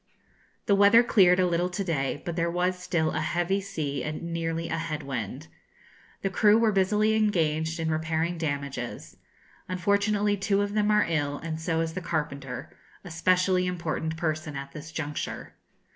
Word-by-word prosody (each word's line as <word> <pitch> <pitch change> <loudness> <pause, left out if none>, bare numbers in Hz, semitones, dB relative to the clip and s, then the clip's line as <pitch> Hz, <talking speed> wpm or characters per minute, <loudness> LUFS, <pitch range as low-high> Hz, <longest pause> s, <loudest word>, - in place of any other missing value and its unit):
The 200 - +3
weather 205 +4 +7
cleared 185 -6 +5
a 185 - +4
little 175 0 +1
to 195 +2 -3
day, 145 -5 -2
but 170 - -3
there 170 -1 0
was 180 +2 0
still 160 -3 0
a - - -1
heavy 175 +3 0
sea 155 -8 -3
and 160 +2 -4
nearly 165 0 -2
a 165 - -2
head 155 -2 -4
wind. 135 +2 -5 0.8
The 195 - 0
crew 210 +2 +5
were 225 -1 +3
busily 210 +2 +2
engaged 165 -6 +1
in 160 -1 0
repairing 160 +2 -1
damages. 140 -5 -4 0.5
Unfortunately, 205 +3 +1
two 200 +1 +1
of 205 0 -3
them 210 0 +2
are 210 0 +4
ill, 145 -3 -1
and 160 0 -5
so 165 -1 0
is 165 0 -2
the 185 - -4
carpenter, 140 -6 -4 0.3
a 180 - -9
specially 180 +2 +2
important 160 -2 -3
person 155 -3 -2
at 140 0 -6
this 155 +2 -9
juncture. 150 -2 -5
170 Hz, 170 wpm, -27 LUFS, 155-195 Hz, 0.8 s, weather